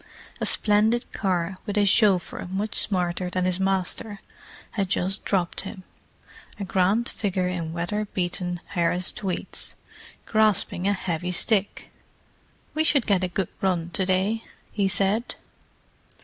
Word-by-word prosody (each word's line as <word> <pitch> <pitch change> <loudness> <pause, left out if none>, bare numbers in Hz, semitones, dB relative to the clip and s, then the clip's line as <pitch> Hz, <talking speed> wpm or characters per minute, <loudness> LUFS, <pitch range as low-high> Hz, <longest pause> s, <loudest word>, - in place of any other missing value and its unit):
A - - -1
splendid 220 +3 +2
car, 185 -1 -1
with 205 0 -2
a 205 - +4
chauffeur 195 -4 +2
much 200 +3 -2
smarter 180 -2 +1
than 180 0 -1
his 185 0 +2
master, 195 +2 0 0.5
had 195 -4 -1
just 195 +2 +1
dropped 180 -4 0
him: 190 -1 -8 0.8
a - - -2
grant 195 +5 +2
figure 185 -3 -1
in 170 -3 -3
weatherbeaten 180 -1 -2
Harris 175 0 +2
tweeds, 190 -3 -4 0.5
grasping 215 -4 +2
a 205 - +3
heavy 180 -2 -2
stick. 205 +2 0 0.8
"We 315 - +2
should 285 -5 +4
get 195 -3 +2
a - - +1
good 180 0 -2
run 175 -3 0
to 190 - +1
day," 195 +4 +1 0.3
he 200 -2 +1
said. 200 +5 +1
190 Hz, 135 wpm, -25 LUFS, 180-205 Hz, 0.8 s, a